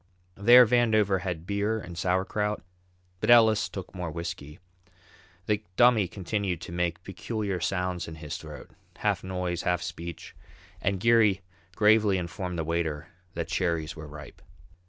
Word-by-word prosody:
There 120 +6 +7
Vandover 110 -5 +3
had 85 -3 -4
beer 105 +3 -1
and 90 -4 -9
sauerkraut, 95 +4 -1 0.6
but - - -2
Ellis 110 -3 +6
took 95 -2 -8
more 90 -3 -4
whisky. 85 -2 -6 0.9
The 105 0 0
Dummy 120 -5 +5
continued 95 -1 -3
to - - -8
make 85 0 -2
peculiar 100 0 -4
sounds 90 0 -2
in 80 - -8
his 75 -2 -6
throat, - - -11 0.3
half - - 0
noise, 90 -2 -3
half 90 -1 0
speech, 85 -1 -7 0.5
and 100 -1 0
Geary 110 -3 +4 0.3
gravely 105 -2 +4
informed 90 0 -4
the 80 - -1
waiter 80 -1 -2 0.3
that 85 0 -3
cherries 85 -4 -1
were 80 -1 -9
ripe. 75 -1 -11
90 Hz, 140 wpm, -27 LUFS, 85-105 Hz, 0.9 s, There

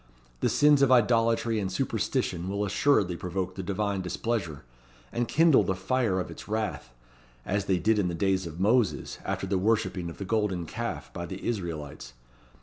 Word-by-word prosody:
The - - +1
sins 145 -1 +5
of 135 -2 +4
idolatry 115 -1 +3
and 95 -2 -2
superstition 90 -1 -1
will 100 +1 -1
assuredly 100 -3 +2
provoke 90 +1 -3
the 95 - -5
Divine 100 +1 -1
displeasure, 90 -4 -3 0.5
and 120 0 -1
kindle 160 +1 +5
the 95 - -1
fire 95 0 0
of 90 - -4
its - - -10
wrath, 105 - -3 0.5
as 100 0 -1
they 95 -2 +2
did 105 +4 +2
in 95 - +1
the 85 - -2
days 95 0 0
of 80 +1 -9
Moses, 110 +2 +1
after - - -2
the 95 0 0
worshipping 95 -4 0
of 85 - -10
the 100 - -5
Golden 100 -5 0
Calf - - -5
by 85 - -5
the 95 +2 -7
Israelites. 80 - -4
95 Hz, 175 wpm, -28 LUFS, 90-110 Hz, 0.5 s, sins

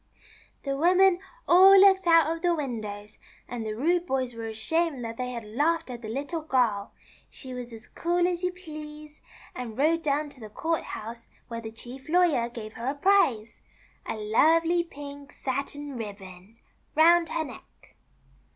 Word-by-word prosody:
The 275 -1 -2
women 360 +4 +4 0.3
all 385 +3 +8
looked 385 -2 +5
out 330 -1 +6
of 330 - -10
the 350 -1 +2
windows, 215 -7 -6 0.3
and 240 -2 -5
the 215 -1 -4
rude 345 +8 +1
boys 260 -2 -1
w^ere 225 -1 -6
ashamed 275 +4 -1
that 230 0 -6
they 250 0 -3
had 235 -3 -6
laughed 295 +7 0
at 240 -1 -7
the 220 - -7
Little 285 +7 -3
Girl. 240 -9 0 0.4
She 260 -2 -9
was 250 -1 -7
as 225 0 -11
cool 350 +1 0
as 350 -1 -2
you 360 0 0
please, 305 -4 -10 0.3
and 235 -3 -7
rode 320 +4 +2
down 295 -1 0
to 280 -2 -11
the 215 -2 -9
court 325 +9 -1
house 230 +2 -8 0.2
wRere 230 0 -4
the 220 -1 -7
Chief 250 +5 -9
Lawyer 315 -9 +3
gave 220 -2 -8
her 245 +4 -3
the - - -21
prize 270 - +2 0.2
— - - -33
a - - -2
lovely 325 +11 +3
pink 285 -2 -10
satin 280 +1 -4
ribbon 200 -2 -9 0.2
— - - -41
round 335 +2 +5
her 325 - -1
neck. 260 - -14
280 Hz, 175 wpm, -27 LUFS, 230-330 Hz, 0.4 s, all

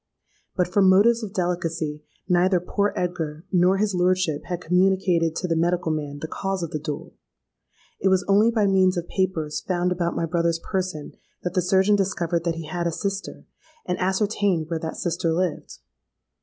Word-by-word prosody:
But, 180 - +1
from 190 +1 +4
motives 225 +5 +5
of 215 -3 -5
delicacy, 170 -5 -2 0.3
neither 180 0 +3
poor 200 +3 0
Edgar 165 -2 -3
nor 180 +1 +4
his 205 0 0
lordship 180 -4 +1
had 175 -2 -3
communicated 180 -2 +2
to 180 - -2
the 165 - 0
medical 170 0 +1
man 145 -2 -3
the 160 - -4
cause 195 +1 -3
of 165 - -4
the 155 - -3
duel. 150 0 -6 0.9
It - - +1
was 190 -1 +2
only 205 +3 +5
by 225 -3 +2
means 190 -1 +3
of 175 0 -3
papers 170 -6 -1
found 180 -1 -1
about 175 -1 -1
my 165 - 0
brother's 170 0 0
person 180 -3 -4 0.3
that 180 - -3
the 185 - +2
surgeon 190 +3 +3
discovered 175 -3 -1
that 170 -1 0
he 165 -1 -6
had 175 +2 -2
a - - 0
sister, 195 +4 -4 0.4
and 180 - -2
ascertained 190 -3 0
where 165 - -1
that 160 0 -5
sister 170 -1 -1
lived. 175 0 -2
180 Hz, 180 wpm, -24 LUFS, 165-190 Hz, 0.9 s, motives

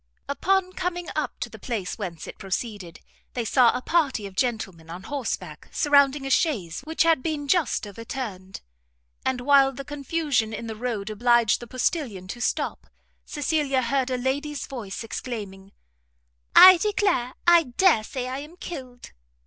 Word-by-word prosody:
Upon 370 +5 +1
coming 355 -1 -3
up - - -2
to - - -1
the - - -11
place 225 -5 -4
whence 175 -6 -5
it - - -10
proceeded, 195 -2 -5 0.3
they 240 -2 -2
saw 245 +1 +5
a 250 - -8
party 285 -11 +1
of 195 -1 -9
gentlemen 195 -10 -2
on 175 +3 -8
horseback 280 +1 -5
surrounding 280 -1 +3
a 270 - -3
chaise 210 - 0
which 320 +2 +1
had 330 -4 +3
been 295 -1 -3
just 325 -8 +1
overturned; 205 -3 -7 0.6
and 260 -1 -1
while 275 0 +5
the 275 +1 -8
confusion 285 -5 -1
in 230 - -6
the 220 -1 -5
road 215 -3 -3
obliged 240 +1 +3
the 240 - -9
postilion 245 - -2
to 240 - -6
stop - - -2 0.4
Cecilia 290 -3 0
heard 265 +2 0
a 255 - -1
lady's 280 +3 -2
voice 230 -6 -6
exclaiming, 200 -5 -6 0.8
"I 370 0 +11
declare 400 - 0
I 345 -2 +6
dare 250 - +3
say 250 +3 -5
I 260 +1 -4
am 305 +5 -11
killed!" 255 -9 -8
255 Hz, 155 wpm, -25 LUFS, 220-295 Hz, 0.8 s, I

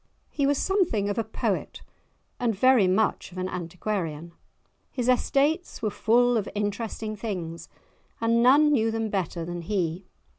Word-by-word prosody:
He 280 -2 0
was 285 0 +2
something 355 - +1
of 205 - -1
a - - +1
poet 220 - -3 0.6
and 235 -4 0
very 245 -2 +5
much 190 +1 0
of 180 - -12
an 185 0 -2
antiquarian. 170 -2 -4 0.6
His 250 -2 -3
estates 280 +6 +1
were 215 - 0
full 240 +3 +3
of 205 - -2
interesting 215 +1 -3
things, 180 -6 -5 0.5
and 230 +1 +2
none 285 +5 +6
knew 225 -6 +2
them 225 -1 -2
better 175 -4 -2
than 175 0 -5
he. 180 -1 -2
215 Hz, 150 wpm, -26 LUFS, 185-245 Hz, 0.6 s, none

